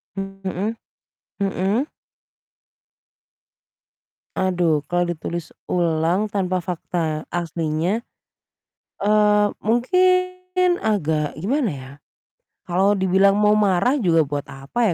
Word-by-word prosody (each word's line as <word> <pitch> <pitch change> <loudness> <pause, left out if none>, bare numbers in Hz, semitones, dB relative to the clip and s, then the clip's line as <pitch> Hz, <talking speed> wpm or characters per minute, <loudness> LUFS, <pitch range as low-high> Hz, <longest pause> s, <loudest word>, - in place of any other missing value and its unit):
Mhm. 195 +2 -4 0.6
Mhm. 200 +7 0 2.5
Aduh 175 -5 +1
kalau 175 0 +1
ditulis 165 +1 -6 0.2
ulang 170 +3 +1
tanpa 185 -3 -1
fakta 165 -3 -3
aslinya, 170 +5 -1 1.0
eee, 210 0 +4
mungkin 365 - +1
agak 160 -8 0
gimana 235 - 0
ya, 130 0 -10 0.8
kalau 190 +4 +3
dibilang 190 0 +3
mau 210 +1 +3
marah 210 +6 +2
juga 170 - +3
buat 145 -1 -3
apa 170 - -1
190 Hz, 85 wpm, -22 LUFS, 165-215 Hz, 2.5 s, eee